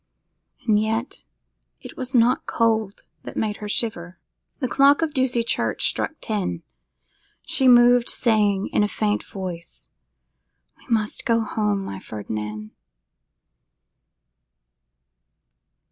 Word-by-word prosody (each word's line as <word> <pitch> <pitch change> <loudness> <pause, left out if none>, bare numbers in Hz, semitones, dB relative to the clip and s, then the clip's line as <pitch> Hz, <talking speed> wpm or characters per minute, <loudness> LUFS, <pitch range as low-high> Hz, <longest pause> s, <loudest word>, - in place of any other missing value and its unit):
And 210 -2 +4
yet 225 +3 -3 0.5
it - - -11
was 255 +1 -5
not 240 +2 +3
cold 220 -3 0 0.2
that - - -9
made 210 -2 -1
her 210 - -7
shiver. 180 -6 -3 0.4
The 260 - -2
clock 280 +5 +4
of 310 -2 -2
Ducie 255 -3 +1
Church 235 - 0
struck - - -2
ten. 200 - -3 0.8
She 265 - +2
moved, 245 0 +6
saying, 210 -4 +1
in - - +1
a - - +2
faint 210 0 -1
voice, 175 -4 -8 0.9
'We - - -22
must 215 -3 0
go 230 -1 +2
home, 210 -3 -1
my 95 - -6
Ferdinand! 105 0 -6
220 Hz, 115 wpm, -23 LUFS, 195-240 Hz, 0.9 s, moved